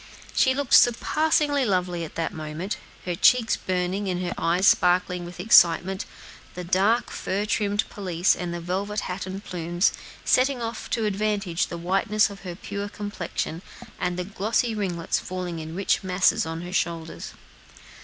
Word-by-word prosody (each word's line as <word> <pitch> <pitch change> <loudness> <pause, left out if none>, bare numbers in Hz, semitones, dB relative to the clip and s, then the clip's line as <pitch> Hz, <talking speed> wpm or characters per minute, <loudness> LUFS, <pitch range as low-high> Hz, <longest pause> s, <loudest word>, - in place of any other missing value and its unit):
She 260 0 +3
looked 280 -2 -2
surpassingly 290 +3 +4
lovely 180 -5 0
at 160 - -8
that 165 - -2
moment, 155 +5 -5 0.3
her 180 - -1
cheeks 225 +6 +4
burning, 185 +2 -2
and 180 -1 -1
her 175 - -2
eyes 175 +3 +1
sparkling 180 -1 +3
with 175 0 -10
excitement; 185 -1 +4 0.5
the 180 - -5
dark, 195 +7 +2
fur 200 +2 -2
trimmed 205 -1 0
pelisse, 180 -3 +1
and 175 -1 -4
the 175 - -4
velvet 195 +5 -2
hat 185 +1 -5
and 190 +2 -6
plumes, 175 +1 0 0.3
setting 260 0 +3
off 230 -1 -5
to 225 - 0
advantage 205 -4 0
the 170 - -6
whiteness 200 +5 +1
of 200 - -10
her 180 -2 -6
pure 200 +2 -5
complexion 200 -5 -4 0.4
and 180 -1 -1
the 180 - -1
glossy 215 +4 0
ringlets 180 -6 -1
falling 180 -2 -5
in 160 +1 -7
rich 195 +1 +1
masses 185 -3 +2
on 165 +1 -4
her 180 +1 -7
shoulders. 165 -3 -3
185 Hz, 160 wpm, -25 LUFS, 175-210 Hz, 0.5 s, surpassingly